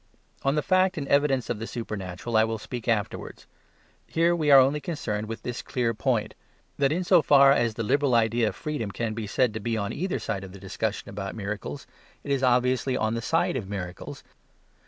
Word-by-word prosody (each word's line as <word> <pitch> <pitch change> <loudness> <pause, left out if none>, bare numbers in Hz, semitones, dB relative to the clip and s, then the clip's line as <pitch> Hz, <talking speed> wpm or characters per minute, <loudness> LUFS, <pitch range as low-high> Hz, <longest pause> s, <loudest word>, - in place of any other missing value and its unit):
Of 135 +1 +1
the 150 - 0
fact 185 +2 +2
and 140 -3 -3
evidence 140 -3 +2
of 115 - -3
the 115 - -5
supernatural 105 -1 -5
I 110 - +6
will 110 0 -1
speak 120 +1 -7
afterwards. 110 -3 -2 0.6
Here 170 +1 +2
we 155 -3 0
are 140 -1 +9
only 135 +3 +3
concerned 115 -9 -3
with 115 0 -6
this 125 0 -4
clear 120 -2 -1
point; 110 -2 -1 0.5
that 140 -1 +3
in 175 +4 0
so 180 -1 +5
far 140 -2 +6
as 120 -5 +2
the 115 - -2
liberal 140 +3 +2
idea 115 0 +2
of - - -3
freedom 150 -9 -4
can 110 +2 -3
be 110 -1 -5
said 120 +2 +1
to 110 - -4
be 115 +1 -2
on 100 -2 -2
either 185 +2 -2
side 100 -3 -4
in 95 -1 -10
the 100 - -11
discussion 100 +2 -3
about 100 0 -5
miracles, 100 -8 -5 0.4
it 140 - -4
is 135 -2 +1
obviously 125 +1 +2
on 110 -2 0
the 115 - -2
side 165 +5 +1
of 105 -7 -4
miracles. 90 -3 -6
120 Hz, 210 wpm, -26 LUFS, 105-140 Hz, 0.6 s, are